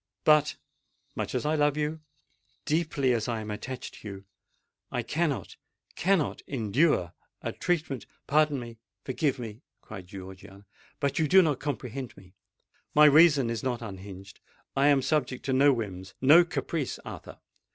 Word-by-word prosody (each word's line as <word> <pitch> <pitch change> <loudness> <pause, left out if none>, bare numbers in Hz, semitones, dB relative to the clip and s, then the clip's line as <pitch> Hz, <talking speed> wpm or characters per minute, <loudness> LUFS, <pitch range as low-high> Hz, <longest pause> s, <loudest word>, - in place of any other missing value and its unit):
But—much 150 -1 -1
as - - -1
I 150 - +1
love 150 -1 +2
you—deeply 150 -1 -3
as 115 -1 -1
I 115 -2 -2
am 105 -1 -6
attached 130 +5 -6
to - - -9
you—I 100 -1 -9
cannot—cannot 160 - -2
endure 120 - +1 0.3
a - - -2
treatment——" 150 - -2 0.2
"Pardon 150 -1 +2
me—forgive 125 +4 -4
me!" 115 -1 -8 0.2
cried 95 -4 -10
Georgiana; 95 +1 -11 0.3
"but 140 +2 0
you 155 - +2
do 190 +5 +7
not 150 -5 0
comprehend 135 -3 -5
me! 95 -1 -16 0.6
My 150 +1 +8
reason 150 -4 +6
is 115 -1 -3
not 125 -2 -2
unhinged,—I 100 +7 -5
am 140 -2 +4
subject 130 -3 -1
to 135 - 0
no 140 +2 +5
whims—no 115 - +3
caprice, 165 -4 -3
Arthur! - - -9
135 Hz, 130 wpm, -28 LUFS, 110-150 Hz, 0.6 s, My